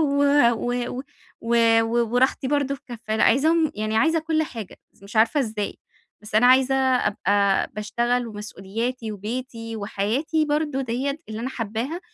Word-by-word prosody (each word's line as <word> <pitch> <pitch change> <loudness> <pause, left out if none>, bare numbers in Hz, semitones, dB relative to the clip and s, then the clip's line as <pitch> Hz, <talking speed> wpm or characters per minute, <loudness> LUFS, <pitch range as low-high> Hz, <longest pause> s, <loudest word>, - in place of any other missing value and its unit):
و 285 -2 +2 0.3
و 245 +1 -2 0.2
و 255 - -5 0.4
و 235 +1 +1 0.3
و 235 +1 +1
وراحتي 260 +1 +2
برضه 280 -1 0
في 270 - -12
كفّة. 225 -3 -4
لأ - - +3
عايزاهم 315 +6 +3
يعني 215 +1 -2
عايزة 325 +7 +3
كل 315 0 0
حاجة، 230 -10 -7
بس - - -28
مش 200 +3 -9
عارفة 225 +6 +4
إزاي. 215 -4 -3 0.4
بس 210 0 -11
أنا 235 +3 +5
عايزة 260 +1 +5
أبقى 205 -6 +2
باشتغل، 240 +4 -1
ومسؤولياتي، 215 +3 -5
وبيتي، 230 +2 -5
وحياتي 220 +10 -1
برضه 295 -2 -1
ديّة 265 +4 -2
اللي 220 +1 -5
أنا 250 - -2
حاباها، 230 - -4
240 Hz, 160 wpm, -23 LUFS, 215-275 Hz, 0.4 s, أنا